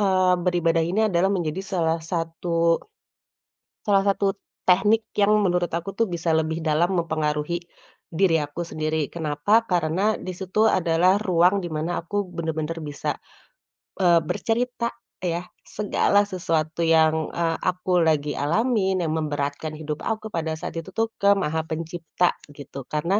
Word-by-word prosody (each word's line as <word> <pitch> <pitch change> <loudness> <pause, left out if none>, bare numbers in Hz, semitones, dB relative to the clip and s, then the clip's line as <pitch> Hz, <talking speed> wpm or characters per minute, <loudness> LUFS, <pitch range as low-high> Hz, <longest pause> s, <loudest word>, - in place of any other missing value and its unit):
eee, 185 -2 +3
beribadah 170 -2 +2
ini 180 +6 0
adalah 190 0 +2
menjadi 175 -1 -1
salah 170 -4 0
satu 165 0 0 1.0
salah 200 -2 +2
satu 200 0 +1 0.3
tehnik 205 +5 +4
yang 205 0 +4
menurut 175 -2 +1
aku 170 +4 -2
tuh, 230 - +3
bisa 170 -2 -2
lebih 160 +1 -1
dalam 160 +4 +1
mempengaruhi 155 0 -1 0.5
diri 165 0 +3
aku 145 +3 -4
sendiri. 155 -2 -2
Kenapa? 160 +8 +1
Karena, 180 +2 +1
di 185 - -5
situ 195 +4 +2
adalah 175 +2 +3
ruang, 185 -1 +3
di - - -3
mana 155 +3 -2
aku 200 +3 -3
bener-bener 165 -2 -3
bisa, 145 -1 -3 0.8
eee, 175 -2 +5
bercerita 235 +7 -1 0.3
ya, 175 -1 -1 0.2
segala 205 0 +1
sesuatu 165 -3 -1
yang, 160 -1 +3
eee, 165 -1 0
aku 180 0 +1
lagi 150 -3 +2
alamin, 190 - +1
yang 160 - -1
memberatkan 145 0 -2
hidup 155 -1 -5
aku, 220 -1 -2
pada 160 -2 -2
saat - - -6
itu 165 - -9
tuh, 225 0 0
ke 200 0 +6
Maha 160 -4 -1
Pencipta, 165 +2 -1 0.2
gitu. 140 -1 -9
Karena 170 +7 0
170 Hz, 140 wpm, -24 LUFS, 160-190 Hz, 1.0 s, ke